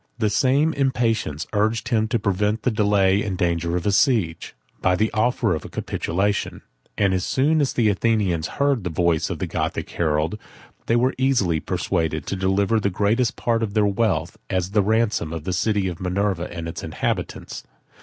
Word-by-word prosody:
The 110 -3 0
same 140 +7 +2
impatience 115 - 0
urged 110 +2 0
him 110 -3 +2
to 115 - 0
prevent 105 +1 0
the 125 - +2
delay 100 -2 +3
and 100 -4 -3
danger 85 -1 0
of 85 - -4
a 105 - +2
siege, 100 -7 +1 0.3
by 90 0 +3
the 110 +4 +1
offer 115 -1 +1
of 80 - -3
a - - -9
capitulation; 100 +4 -2 0.3
and 100 -2 +2
as 90 -1 0
soon 150 +4 +2
as 140 - 0
the 115 -3 +2
Athenians 100 -5 +1
heard 140 -6 +1
the 90 - -2
voice 85 0 +1
of - - -3
the - - -2
Gothic - - -3
herald, 80 +4 0 0.5
they 115 - +3
were 125 +3 +2
easily 110 -12 +2
persuaded 80 -1 -2
to - - -3
deliver 95 +3 +1
the 100 - 0
greatest 105 +5 +1
part 115 -1 0
of 110 -2 -3
their 105 -1 +4
wealth, 100 0 0
as 95 0 -1
the 105 0 +3
ransom 110 -5 +1
of 80 -2 -5
the 90 - -2
city 100 +1 +1
of 90 -1 -5
Minerva 90 -1 -1
and 85 -2 -5
its 80 - -6
inhabitants. - - -3
100 Hz, 185 wpm, -23 LUFS, 90-115 Hz, 0.5 s, their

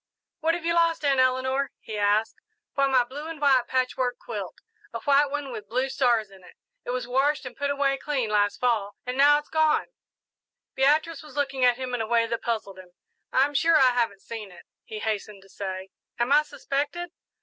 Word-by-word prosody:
"What 330 0 +1
have 345 -2 -6
you 335 - +2
lost, 335 -2 +2
Aunt 275 -2 +3
Eleanor?" 260 +2 +1
he 220 - -8
asked. 210 +2 +2 0.4
"Why, 275 0 +2
my 260 -2 +4
blue 280 +6 -8
and 325 -2 -7
white 265 -4 +3
patchwork 255 -1 0
quilt 205 -6 -6 0.4
a 230 - -5
white 285 0 +3
one 285 -1 -4
with 210 -4 -8
blue 255 +4 0
stars 240 -6 +1
in 190 -1 -16
it. - - -16 0.3
It - - -8
was 250 -1 -2
washed 270 +4 +1
and 255 - -8
put 285 0 -2
away 280 -1 +1
clean 260 -7 -2
last 205 -1 +1
Fall, 220 -5 0
and 250 0 -3
now 290 +2 +6
it's 295 - -7
gone." 315 -1 +2 0.8
Beatrice 300 +4 +2
was 300 -2 -14
looking 275 -2 -1
at 245 -1 +4
him 255 -1 -5
in 245 - -1
a 220 - -3
way 230 0 +3
that 230 0 -3
puzzled 215 -5 -3
him. 180 -1 -14 0.4
"I'm 275 +3 +3
sure 325 +3 +4
I 260 -3 +5
haven't 230 -6 -1
seen 215 -4 -7
it," 175 - -15 0.2
he 215 - -7
hastened 210 -2 -4
to 195 - -20
say. 190 -1 -6 0.3
"Am 240 +3 0
I 295 +1 +7
suspected?" 290 +3 -3
255 Hz, 205 wpm, -26 LUFS, 225-285 Hz, 0.8 s, I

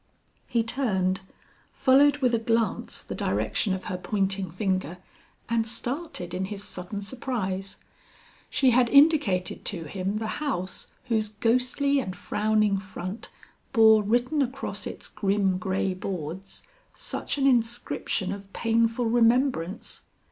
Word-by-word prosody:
He 235 -3 +1
turned, 195 -7 0 0.5
followed 280 +2 +5
with 250 -2 +3
a 230 - +3
glance 225 -2 0
the - - -6
direction 110 - 0
of 190 - -7
her 180 - -3
pointing 195 -1 -1
finger 185 -1 -2 0.5
and 230 -1 +1
started 240 - -3
in 190 +1 -1
his 200 0 -5
sudden 200 +1 -5
surprise. 195 -5 -3 0.7
She 260 -2 +3
had 245 0 +4
indicated 280 - +4
to 175 -5 -2
him 190 +5 -3
the 220 - -3 0.2
house 185 -11 -2 0.2
whose 220 -4 0
ghostly 255 +6 +1
and 185 -8 -4
frowning 215 -1 +1
front 190 +1 -7 0.4
bore 220 -2 +7
written 240 +8 +1
across 270 +1 -3
its - - -7
grim 195 -2 0
gray 190 +1 0
boards, 185 0 -5 0.3
such - - -3
an 275 - +1
inscription 230 -5 +1
of 200 0 -8
painful 230 +1 +1
remembrance. 230 -5 +1
215 Hz, 125 wpm, -26 LUFS, 190-245 Hz, 0.7 s, bore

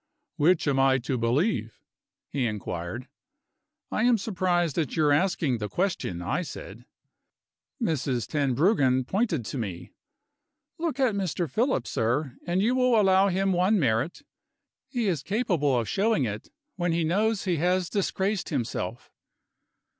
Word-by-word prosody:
"Which 160 +2 +3
am 135 -2 +2
I 135 0 +4
to 130 +1 -2
believe?" 115 - 0 0.5
he 130 -4 0
inquired. 105 +2 -5 0.8
"I - - 0
am 240 0 +4
surprised 180 -6 0
at 155 -6 -2
your 150 -2 +3
asking 145 -5 +1
the 105 -1 -3
question," 135 - -2
I 100 - -1
said. 120 - -9 0.9
Mrs. 130 -6 -1
Tenbruggen 140 - +2
pointed 190 - 0
to 130 - -4
me. 95 -7 -5 0.9
"Look 320 -5 -2
at 255 -5 +3
Mr. 185 -3 -1
Philip, 220 - 0
sir 125 +4 -1
and 180 +3 +1
you 235 +4 +2
will 250 -3 +3
allow 195 -1 +4
him 195 +1 +1
one 185 +4 +3
merit. 135 - 0 0.6
He 245 -4 -2
is 170 -7 0
capable 175 - +1
of 115 - -3
showing 205 -6 +1
it, 105 -1 -5 0.3
when 175 -2 0
he 170 0 +1
knows 205 +6 +1
he 180 -4 0
has 180 +3 +1
disgraced 195 +1 -1
himself." 120 -3 -3
165 Hz, 140 wpm, -27 LUFS, 130-195 Hz, 0.9 s, I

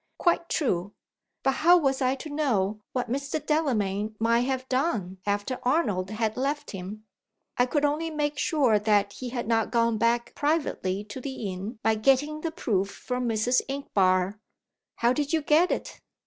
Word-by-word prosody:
Quite 340 -1 +1
true! 200 - -1 0.5
But 270 - +3
how 350 +3 +7
was 270 -4 +1
I 260 +1 +2
to 275 +3 -8
know 215 -9 0
what 250 -1 -2
Mr. 275 +5 -2
Delamayn 220 -10 0
might 230 +3 +2
have 260 -1 -2
done 225 - -1
after 205 +5 -1
Arnold 215 - +1
had 220 0 -1
left 280 +3 -2
him? 200 +3 -7 0.5
I 245 - +3
could 295 +2 +1
only 305 +3 0
make 295 -2 -2
sure 265 -11 +3
that 205 -1 +2
he 255 - -6
had 240 -2 -4
not 225 -1 +1
gone 230 -2 +1
back 235 +1 +1
privately 285 - -1
to 210 +5 -8
the 245 -8 -4
inn, 200 +6 -6
by 225 - +4
getting 275 +7 +2
the 330 - -1
proof 205 - -1
from 250 +3 -3
Mrs. 225 +3 +2
Inchbare." 195 -8 +1 0.6
"How 235 +1 +2
did 290 +2 -2
you 320 -2 +2
get 315 +5 +4
it?" - - -4
245 Hz, 170 wpm, -27 LUFS, 210-290 Hz, 0.6 s, how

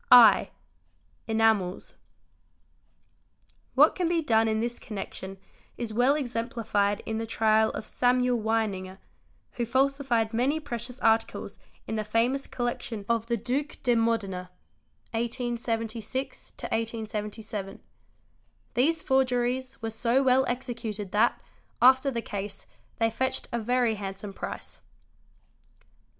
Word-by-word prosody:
I, 245 -2 +8 0.8
Enamels. 220 -5 +1
_ - - -29 1.8
What - - +7
can 360 -2 0
be 335 -1 +1
done 225 -4 +3
in 220 0 +1
this 235 +1 -2
connection 195 -2 -6 0.4
is 230 -2 -4
well 250 +5 +4
exemplified 230 -6 -1
in 220 0 -2
the 225 - -3
trial 220 -1 +3
_ - - -15
of - - -5
Samuel 250 -1 +2
Weininger, 205 -4 -1 0.5
who 240 - -2
falsified 260 -3 +1
many 265 +7 +1
precious 250 -3 -5
articles 225 0 +1 0.3
in 220 - -2
the 215 - 0
famous 235 +6 +1
collection 240 -3 -3
of 230 -1 0
the 235 0 +1
Duc 260 +7 -2
de 245 - +3
Modena 215 -6 0 0.6
(1876 235 +1 -3
1877) 215 -2 -4
4%. - - -26 0.9
These 315 +6 +2
forgeries 255 -1 0
were 225 - -2
so 235 +4 +2
well 260 0 +4
executed 230 -5 -4
that, 220 +3 +3 0.4
after 260 +2 +6
the 235 -3 -3
case, 200 0 -5 0.3
they 225 0 +2
fetched 260 +3 -1
a 235 - -1
very 245 0 +2
handsome 195 -1 -6
price. - - -6
230 Hz, 120 wpm, -28 LUFS, 220-250 Hz, 1.8 s, I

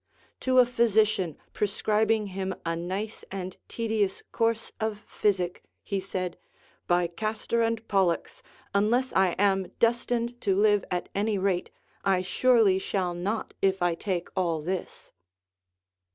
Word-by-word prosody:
To 260 0 +1
a 250 - +8
physician 215 -7 +2 0.2
pre 210 - +1
scribing 215 +1 +1
him 190 0 -3
a 165 0 0
nice 190 +6 -4
and 185 -1 -5
tedious 220 -4 -1
course 230 -1 0
of 215 -1 -2
physic, 185 -6 -1 0.2
he 200 - -2
said, 185 -2 -4 0.5
By 175 0 +3
Castor 215 +6 -1
and 230 0 0
Pollux, 190 -4 +1 0.3
unless 235 +6 +2
I 190 -2 +3
am 195 -2 +2
destined 235 +1 +1
to 195 -1 +2
live 205 -1 +4
at 180 -1 -2
any 205 +1 0
rate, 190 -2 0 0.3
I 190 -2 +2
surely 220 -2 +4
shall 190 -2 -1
not 195 +6 -3
if 190 -1 +2
I 175 -1 +3
take 180 0 -3
all 170 -5 0
this. 185 +2 -5
200 Hz, 135 wpm, -27 LUFS, 185-220 Hz, 0.5 s, a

